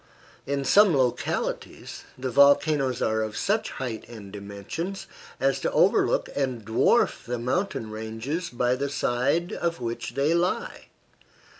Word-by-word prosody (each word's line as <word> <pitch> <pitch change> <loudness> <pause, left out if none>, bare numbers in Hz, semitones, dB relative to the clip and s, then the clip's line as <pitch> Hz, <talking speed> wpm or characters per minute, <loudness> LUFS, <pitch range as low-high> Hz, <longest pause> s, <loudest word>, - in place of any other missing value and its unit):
In 140 0 -1
some 195 0 +5
localities 125 -2 -2
the 130 0 -3
volcanoes 140 -1 +4
are 110 0 +1
of 110 -1 -4
such 215 +2 0
height 120 -4 -5
and 105 -4 -10
dimensions 100 - -6 0.3
as 135 0 +1
to - - -1
overlook - - +3
and 130 -6 -2
dwarf 110 +1 +2
the 125 0 -3
mountain 125 - -2
ranges 110 +10 -4
by 125 0 +1
the 140 +2 -2
side 140 +6 0
of 170 -1 -2
which 120 0 -4
they 140 +4 +2
lie. 175 +2 -1
130 Hz, 135 wpm, -26 LUFS, 115-155 Hz, 0.3 s, some